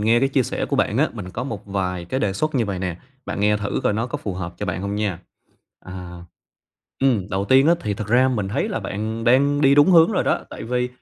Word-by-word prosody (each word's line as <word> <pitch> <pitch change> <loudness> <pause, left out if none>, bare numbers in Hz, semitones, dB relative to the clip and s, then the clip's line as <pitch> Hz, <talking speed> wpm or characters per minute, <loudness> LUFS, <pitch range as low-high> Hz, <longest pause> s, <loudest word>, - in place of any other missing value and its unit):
nghe 115 +3 +3
cái 135 - +2
chia 135 -1 +2
sẻ - - -3
của - - -1
bạn - - +1
á, - - +3
mình 90 - -7
có - - -4
một 105 -6 -6
vài 90 -3 -2
cái 130 +10 -3
đề 100 - 0
xuất 155 +9 -2
như 120 - +2
vậy 100 -2 -3
nè, 90 -2 -3 0.3
bạn - - -4
nghe 105 +1 +3
thử 100 -1 -2
coi - - +2
nó 115 +3 -1
có - - -4
phù 100 - -5
hợp 90 -1 -5
cho 105 - -3
bạn 90 -1 -3
hông 100 0 -3
nha. 105 -5 -2 0.6
À 90 -2 -9 0.8
ừm, 120 -8 +2
đầu 95 +1 -1
tiên 130 +6 +5
á, 170 - +5
thì 105 -1 -2
thật 105 +1 -5
ra 125 +3 +4
mình 105 -7 -1
thấy 100 - -1
là - - -3
bạn 110 +3 -4
đang 140 +4 +3
đi 140 -1 +5
đúng 145 +5 +6
hướng 170 +3 +6
rồi - - +1
đó, - - +1
tại - - -8
vì, 125 +1 -1
105 Hz, 265 wpm, -22 LUFS, 95-130 Hz, 0.8 s, đúng